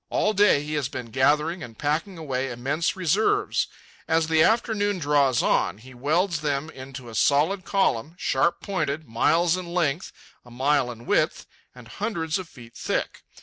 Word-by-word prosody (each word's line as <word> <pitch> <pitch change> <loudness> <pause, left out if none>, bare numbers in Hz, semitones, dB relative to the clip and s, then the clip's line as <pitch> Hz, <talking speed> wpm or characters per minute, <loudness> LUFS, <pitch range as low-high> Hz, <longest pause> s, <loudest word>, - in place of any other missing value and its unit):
All 215 - +1
day 200 -8 +4
he 150 +1 -5
has 145 -4 -1
been 125 -5 -7
gathering 150 +7 +2
and 115 -7 -9
packing 160 +6 -1
away 135 -4 -2
immense 140 +8 -1
reserves. 215 - +1 0.4
As 160 0 +2
the 160 -1 +4
afternoon 210 -1 +2
draws 140 -5 +2
on, 95 - +1
he 130 +4 -14
welds 155 +6 0
them 150 +1 -2
into 130 -1 -9
a 115 - -9
solid 150 - +2
column, 165 - 0
sharp 170 -2 +1
pointed, 155 -6 -2
miles 165 +9 +2
in 185 -1 -5
length, 165 -1 0 0.3
a 120 - -16
mile 135 +2 +1
in 120 -1 -9
width, - - +1 0.3
and 125 -2 -13
hundreds 165 - -2
of 180 -3 -8
feet 120 -2 -14
thick. - - -3
150 Hz, 165 wpm, -25 LUFS, 130-175 Hz, 0.4 s, day